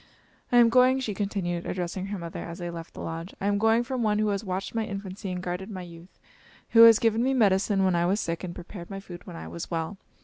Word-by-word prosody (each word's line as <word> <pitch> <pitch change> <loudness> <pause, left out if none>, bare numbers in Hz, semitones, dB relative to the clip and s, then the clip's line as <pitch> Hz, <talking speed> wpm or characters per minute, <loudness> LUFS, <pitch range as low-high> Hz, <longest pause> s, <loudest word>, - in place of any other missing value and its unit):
"I 245 - +5
am 235 -1 +7
going," 255 +2 +5
she 230 -5 -2
continued, 190 -4 -2
addressing 185 +1 -3
her 200 0 -4
mother 170 -2 -6
as 170 0 -7
they 175 -1 -5
left 165 -1 -9
the - - -7
lodge, 165 +2 -6
"I - - -4
am 205 0 +2
going 225 +2 +3
from 255 0 -3
one 210 -2 +2
who 215 0 +1
has 200 +1 -1
watched 190 -1 -4
my 225 -1 0
infancy 195 -2 -6
and 180 0 -4
guarded 180 +3 -4
my 185 -3 -6
youth; 170 +1 -13 0.5
who 230 - +7
has 225 -1 +9
given 225 0 +2
me 265 +1 +2
medicine 195 -3 +3
when 185 - +3
I 170 0 +2
was 200 +4 +1
sick 165 -1 -3
and 175 -2 -5
prepared 175 0 -9
my 195 -1 -5
food 175 -3 -11
when - - -8
I 80 0 -7
was 85 +1 -7
well. 165 +4 -3
195 Hz, 260 wpm, -27 LUFS, 175-215 Hz, 0.5 s, has